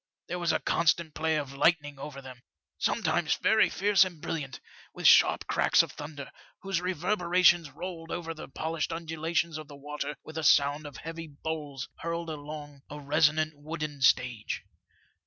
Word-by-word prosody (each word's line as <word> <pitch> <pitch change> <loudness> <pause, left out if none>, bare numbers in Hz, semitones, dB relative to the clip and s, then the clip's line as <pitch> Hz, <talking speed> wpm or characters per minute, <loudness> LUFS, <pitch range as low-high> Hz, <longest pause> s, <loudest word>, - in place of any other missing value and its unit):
There 180 - -3
was 170 -1 +1
a - - +1
constant 170 -1 +1
play 160 0 0
of 140 -3 -3
lightning 145 -1 +2
over 140 -1 -8
them, 130 -2 -11 0.4
sometimes - - +1
very - - +3
fierce 200 +1 +4
and 180 -4 -6
brilliant, 145 -2 -4 0.4
with - - -6
sharp - - +6
cracks - - +4
of - - -7
thunder, 145 -2 -8 0.3
whose 195 -3 -1
reverberations 180 -2 +3
rolled 165 +3 -7
over 165 -1 -4
the 155 - -9
polished 160 +3 -3
undulations 165 0 -2
of 155 - -9
the 145 - -11
water 145 0 -5
with 160 +1 -6
a - - -4
sound 145 +1 +4
of 145 - -10
heavy 165 0 -7
bowls 145 -2 -5
hurled 170 0 -3
along 145 -1 -8
a 150 - -7
resonant 155 +2 +2
wooden 150 -1 -6
stage. 125 -4 +2
155 Hz, 160 wpm, -29 LUFS, 145-170 Hz, 0.4 s, sharp